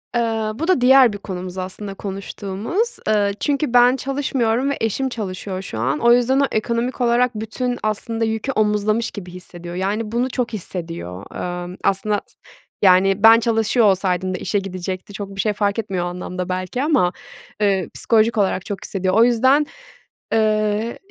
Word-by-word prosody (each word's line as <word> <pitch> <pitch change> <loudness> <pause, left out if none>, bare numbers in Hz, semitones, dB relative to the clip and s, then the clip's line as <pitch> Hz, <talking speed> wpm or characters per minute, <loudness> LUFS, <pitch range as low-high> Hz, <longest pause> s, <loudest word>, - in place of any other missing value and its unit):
Eee, 225 -2 0
bu 320 +7 -3
da 370 -9 +3
diğer 255 -2 +6
bir - - -5
konumuz 185 -2 -6
aslında, 190 +2 -5
konuştuğumuz. 200 - -3
Eee, 205 -2 +2
çünkü 290 -3 0
ben 245 +1 +6
çalışmıyorum 265 -2 0
ve 280 - -1
eşim 225 +5 0
çalışıyor 190 -4 -5
şu 115 - -6
an. 130 +6 0
O 235 0 +5
yüzden 245 +2 +3
o 280 - +4
ekonomik 235 +3 -1
olarak 245 +1 +3
bütün 245 +3 -3
aslında 225 +2 -1
yükü 225 +4 -2
omuzlamış 215 0 +1
gibi 180 -4 -8
hissediyor. 175 -1 -9
Yani, 210 +4 -2
bunu 245 +3 0
çok 250 -2 -2
hissediyor, 165 - -6 0.4
emm, 180 +1 -8
aslında 200 +1 +1
s - - -23 0.5
yani, 195 +1 +4
ben 225 +1 +9
çalışıyor 225 0 +2
olsaydım 185 -1 +1
da - - -2
işe 205 - -1
gidecekti. 185 0 -6
Çok 200 0 -7
bir 195 - 0
şey 210 +1 0
fark 205 +1 0
etmiyor 190 -5 -2
o - - -2
anlamda 180 +1 -5
belki 185 +8 -2
ama, 280 - +2 0.5
eee, 195 -3 +1
psikolojik 225 0 +2
olarak 190 -2 +1
çok 200 - -5
hissediyor. 185 -1 -1
O 225 +3 +6
yüzden, 260 +5 +4 0.7
ııı, 215 0 +1
215 Hz, 170 wpm, -20 LUFS, 190-235 Hz, 0.7 s, ben